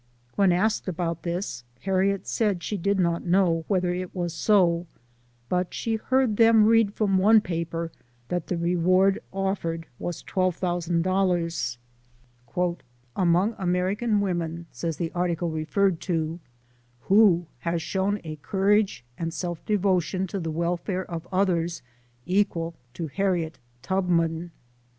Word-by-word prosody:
When 195 Hz, -3 st, +4 dB
asked 205 Hz, +5 st, +1 dB
about 170 Hz, -2 st, -2 dB
this, 170 Hz, -8 st, -3 dB, 0.2 s
Harriet 195 Hz, 0 st, +1 dB
said 205 Hz, -6 st, 0 dB
she 210 Hz, -, -2 dB
did 200 Hz, +1 st, 0 dB
not 170 Hz, -2 st, +1 dB
know 175 Hz, -3 st, +2 dB
whether 180 Hz, -3 st, +1 dB
it 180 Hz, +1 st, -5 dB
was 175 Hz, -2 st, -2 dB
so, 175 Hz, -3 st, +3 dB, 0.6 s
but 180 Hz, +3 st, -1 dB
she 225 Hz, -1 st, -1 dB
heard 255 Hz, -2 st, +1 dB
them 225 Hz, -2 st, +6 dB
read 225 Hz, -2 st, +4 dB
from 195 Hz, -3 st, +2 dB
one 215 Hz, +3 st, +6 dB
paper 165 Hz, -3 st, -3 dB, 0.4 s
that 175 Hz, +1 st, -2 dB
the 180 Hz, -, -1 dB
reward 180 Hz, +3 st, +3 dB
offered 190 Hz, -4 st, -2 dB
was 175 Hz, -2 st, -4 dB
$12,000. 175 Hz, -4 st, 0 dB, 1.2 s
" 120 Hz, 0 st, -37 dB
Among 185 Hz, +5 st, +2 dB
American 195 Hz, +4 st, +1 dB
women," 170 Hz, -3 st, -2 dB
says 165 Hz, -2 st, -3 dB
the 165 Hz, -2 st, -2 dB
article 175 Hz, -1 st, -1 dB
re 155 Hz, 0 st, -3 dB
ferred 195 Hz, -1 st, +2 dB
to, 165 Hz, -2 st, -2 dB, 0.3 s
" 120 Hz, 0 st, -36 dB
who 190 Hz, -, +5 dB
has 170 Hz, 0 st, -1 dB
shown 200 Hz, +2 st, 0 dB
a 155 Hz, -2 st, -6 dB
courage 195 Hz, -, +1 dB
and 165 Hz, 0 st, -2 dB
self 175 Hz, 0 st, -4 dB
devo 195 Hz, -3 st, +3 dB
tion 185 Hz, +4 st, -2 dB
to 195 Hz, +1 st, -4 dB
the 165 Hz, -2 st, -3 dB
welfare 175 Hz, +3 st, -2 dB
of 170 Hz, -1 st, -6 dB
others, 175 Hz, -4 st, 0 dB, 0.4 s
equal 180 Hz, -4 st, 0 dB, 0.2 s
to 165 Hz, -, -3 dB
Harriet 170 Hz, -1 st, -1 dB, 0.2 s
Tubman? 170 Hz, -1 st, 0 dB
180 Hz, 135 wpm, -26 LUFS, 170-195 Hz, 1.2 s, them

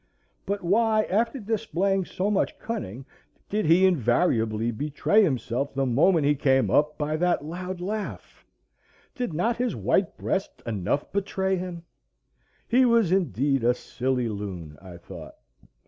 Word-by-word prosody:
But 200 Hz, 0 st, -2 dB
why, 215 Hz, +4 st, +3 dB
after 230 Hz, +7 st, 0 dB
displaying 200 Hz, -3 st, -1 dB
so 195 Hz, +4 st, -2 dB
much 200 Hz, -, 0 dB
cunning, 135 Hz, -, -5 dB, 0.4 s
did 210 Hz, -5 st, 0 dB
he 175 Hz, +4 st, +6 dB
invariably 120 Hz, -, +2 dB
betray 150 Hz, -, +1 dB
himself 135 Hz, -, -1 dB
the 135 Hz, 0 st, +1 dB
moment 150 Hz, +6 st, +3 dB
he 145 Hz, -, +4 dB
came 135 Hz, -2 st, +2 dB
up 150 Hz, +1 st, +2 dB
by 155 Hz, +1 st, -1 dB
that 175 Hz, -3 st, +1 dB
loud 180 Hz, +3 st, -5 dB
laugh? 205 Hz, +3 st, -5 dB, 0.7 s
Did 245 Hz, -6 st, -3 dB
not 220 Hz, +10 st, 0 dB
his 245 Hz, -2 st, -1 dB
white 190 Hz, -3 st, 0 dB
breast 195 Hz, -, -3 dB
enough 110 Hz, +5 st, -2 dB
betray 190 Hz, -1 st, 0 dB
him? 180 Hz, -2 st, -5 dB, 0.8 s
He 250 Hz, +3 st, +4 dB
was 230 Hz, -7 st, +3 dB
indeed 140 Hz, -, +1 dB
a 120 Hz, +1 st, +3 dB
silly 125 Hz, -1 st, -2 dB
loon, 95 Hz, -8 st, -6 dB
I 90 Hz, -3 st, -11 dB
thought. 85 Hz, -, -11 dB
170 Hz, 140 wpm, -26 LUFS, 130-200 Hz, 0.8 s, he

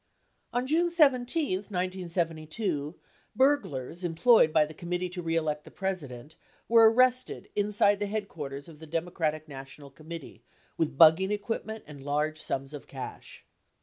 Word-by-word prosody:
On 245 Hz, +1 st, -1 dB
June 330 Hz, +5 st, +2 dB
17, 280 Hz, -, +2 dB
1972, 175 Hz, -4 st, -3 dB, 0.4 s
burglars 185 Hz, -, +1 dB
employed 175 Hz, +2 st, +4 dB
by 155 Hz, -1 st, +4 dB
the 155 Hz, -, -10 dB
Committee 180 Hz, +3 st, -3 dB
to 180 Hz, 0 st, -6 dB
Re 165 Hz, -1 st, -1 dB
Elect 150 Hz, -2 st, -1 dB
the -, -, -13 dB
President 155 Hz, -8 st, -5 dB, 0.3 s
were 225 Hz, -1 st, +7 dB
arrested 255 Hz, +1 st, +2 dB
inside 205 Hz, 0 st, +2 dB
the 205 Hz, -, -1 dB
headquarters 150 Hz, -10 st, -5 dB
of 160 Hz, -3 st, -13 dB
the 160 Hz, -, -11 dB
Democratic 160 Hz, -1 st, -2 dB
National 140 Hz, 0 st, -10 dB
Committee 155 Hz, -4 st, -10 dB, 0.3 s
with 150 Hz, -4 st, -1 dB
bugging 165 Hz, +5 st, +7 dB
equipment 220 Hz, +1 st, -3 dB
and 145 Hz, -2 st, -11 dB
large 150 Hz, +2 st, -1 dB
sums 135 Hz, +2 st, -4 dB
of 145 Hz, -, -9 dB
cash. 130 Hz, -2 st, -9 dB
170 Hz, 140 wpm, -28 LUFS, 150-210 Hz, 0.4 s, were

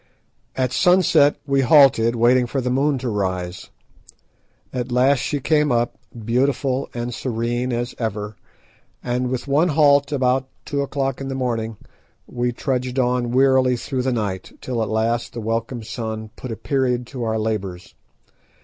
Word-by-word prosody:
At 130 Hz, -1 st, 0 dB
sunset 165 Hz, -1 st, +4 dB
we 140 Hz, -1 st, +2 dB
halted, 125 Hz, -4 st, +5 dB
waiting 120 Hz, +2 st, +3 dB
for 135 Hz, -, -2 dB
the 125 Hz, -1 st, -1 dB
moon 140 Hz, +2 st, +2 dB
to 130 Hz, 0 st, -4 dB
rise. 95 Hz, -4 st, -3 dB, 1.0 s
At 125 Hz, -1 st, -3 dB
last 130 Hz, +2 st, +3 dB
she 145 Hz, -, -2 dB
came 150 Hz, +1 st, +2 dB
up, 120 Hz, -1 st, 0 dB, 0.3 s
beautiful 130 Hz, +2 st, 0 dB
and 120 Hz, 0 st, -3 dB
serene 120 Hz, +1 st, -2 dB
as 120 Hz, +1 st, -2 dB
ever, 105 Hz, -2 st, -3 dB, 0.7 s
and, 125 Hz, +1 st, -1 dB
with 130 Hz, +1 st, -3 dB
one 145 Hz, +5 st, +3 dB
halt 145 Hz, -3 st, +4 dB
about 130 Hz, -1 st, +1 dB, 0.2 s
two 140 Hz, -1 st, -1 dB
o'clock 135 Hz, -1 st, -2 dB
in 135 Hz, -, -4 dB
the 135 Hz, -, -3 dB
morning, 115 Hz, -4 st, -2 dB, 0.5 s
we 120 Hz, 0 st, -2 dB
trudged 125 Hz, 0 st, -2 dB
on 125 Hz, -1 st, +1 dB
wearily 130 Hz, 0 st, +4 dB
through 130 Hz, +2 st, -3 dB
the 130 Hz, +1 st, 0 dB
night, 100 Hz, -6 st, -3 dB
till 120 Hz, -3 st, -3 dB
at 110 Hz, -, -1 dB
last 115 Hz, +2 st, -1 dB
the 120 Hz, -, -5 dB
welcome 115 Hz, +2 st, -3 dB
sun 110 Hz, -1 st, -5 dB
put 130 Hz, -, -7 dB
a -, -, -3 dB
period 125 Hz, -1 st, -1 dB
to 125 Hz, 0 st, -6 dB
our 110 Hz, -1 st, 0 dB
labours. 100 Hz, -5 st, -3 dB
125 Hz, 160 wpm, -21 LUFS, 115-135 Hz, 1.0 s, halted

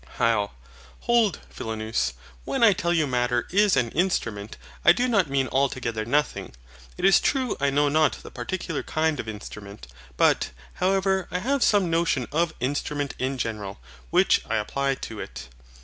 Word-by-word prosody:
HYL. 110 Hz, -3 st, +2 dB, 0.5 s
Hold, 235 Hz, -4 st, +2 dB
Philonous. 110 Hz, -, -2 dB, 0.3 s
When 265 Hz, -, -1 dB
I 220 Hz, -3 st, +7 dB
tell 175 Hz, -2 st, -1 dB
you 165 Hz, -3 st, +2 dB
Matter 125 Hz, -2 st, 0 dB
is 205 Hz, -3 st, +4 dB
an 120 Hz, -3 st, +1 dB
INSTRUMENT, 115 Hz, -, -1 dB, 0.3 s
I 170 Hz, -, +8 dB
do 245 Hz, +7 st, 0 dB
not 200 Hz, -, +2 dB
mean 135 Hz, -1 st, +1 dB
altogether 130 Hz, -5 st, 0 dB
nothing. 145 Hz, -, -1 dB, 0.4 s
It -, -, -1 dB
is 195 Hz, -, +7 dB
true 260 Hz, -5 st, 0 dB
I 140 Hz, 0 st, +2 dB
know 145 Hz, +1 st, +2 dB
not 155 Hz, +1 st, +3 dB
the -, -, -10 dB
particular 165 Hz, +5 st, -4 dB
kind 155 Hz, -2 st, 0 dB
of -, -, -4 dB
instrument; 105 Hz, -3 st, -8 dB, 0.3 s
but, -, -, +3 dB, 0.2 s
however, 190 Hz, 0 st, +1 dB
I 180 Hz, -, -2 dB
have 265 Hz, +8 st, 0 dB
some 195 Hz, -5 st, +3 dB
notion 165 Hz, -7 st, +1 dB
of 165 Hz, +2 st, +1 dB
INSTRUMENT 145 Hz, +2 st, -2 dB
IN 130 Hz, +1 st, -1 dB
GENERAL, 105 Hz, -, -4 dB, 0.3 s
which -, -, +4 dB
I -, -, +1 dB
apply 135 Hz, +6 st, 0 dB
to -, -, -7 dB
it. -, -, -8 dB
145 Hz, 165 wpm, -25 LUFS, 115-185 Hz, 0.5 s, I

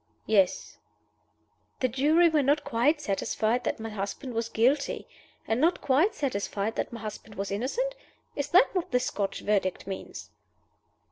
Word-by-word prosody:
"Yes." 195 Hz, -4 st, +1 dB, 1.0 s
"The 255 Hz, -, +2 dB
jury 300 Hz, +8 st, +4 dB
were 315 Hz, -2 st, +3 dB
not 285 Hz, +2 st, +2 dB
quite 285 Hz, +4 st, +2 dB
satisfied 220 Hz, 0 st, -1 dB
that -, -, -1 dB
my 225 Hz, 0 st, -5 dB
husband 215 Hz, +5 st, -5 dB
was 230 Hz, 0 st, -2 dB
guilty? 260 Hz, +7 st, +1 dB, 0.4 s
and 225 Hz, +3 st, +1 dB
not 340 Hz, +3 st, +3 dB
quite 295 Hz, +10 st, +2 dB
satisfied 220 Hz, -5 st, -2 dB
that -, -, -2 dB
my 230 Hz, -2 st, -7 dB
husband 215 Hz, 0 st, -8 dB
was 195 Hz, 0 st, -4 dB
innocent? 280 Hz, -, -1 dB, 0.4 s
Is 285 Hz, 0 st, -2 dB
that 370 Hz, +10 st, +5 dB
what 365 Hz, -3 st, -1 dB
the 250 Hz, -, +2 dB
Scotch 200 Hz, -5 st, -2 dB
Verdict 195 Hz, -3 st, 0 dB
means?" 190 Hz, 0 st, -7 dB
245 Hz, 150 wpm, -28 LUFS, 210-295 Hz, 1.0 s, that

